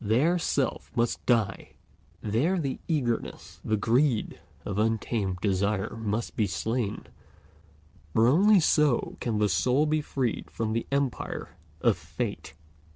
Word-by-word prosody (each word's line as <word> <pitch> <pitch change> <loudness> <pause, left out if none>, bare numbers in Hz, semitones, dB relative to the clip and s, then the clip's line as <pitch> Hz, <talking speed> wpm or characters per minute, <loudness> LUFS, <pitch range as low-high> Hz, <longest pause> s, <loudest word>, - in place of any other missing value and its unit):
There 135 +12 +2
Self 140 -4 -1
must 120 0 0
die; 115 -5 0 0.5
there 125 - +1
the 135 -5 -3
eagerness, 130 -8 -2
the 110 - 0
greed 120 +2 +1 0.3
of 100 0 -2
untamed 110 -3 0
desire 100 +1 0
must 110 0 -3
be 105 - +1
slain, 110 +3 -2 1.1
for 110 +8 +4
only 195 - +6
so 150 -5 +2
can 115 -3 -1
the 105 0 +3
soul 125 - +2
be 155 0 +1
freed 130 -5 -2
from 110 -1 -2
the 115 - -2
empire 140 -2 -2 0.3
of - - +3
Fate. - - -5
115 Hz, 130 wpm, -27 LUFS, 105-140 Hz, 1.1 s, only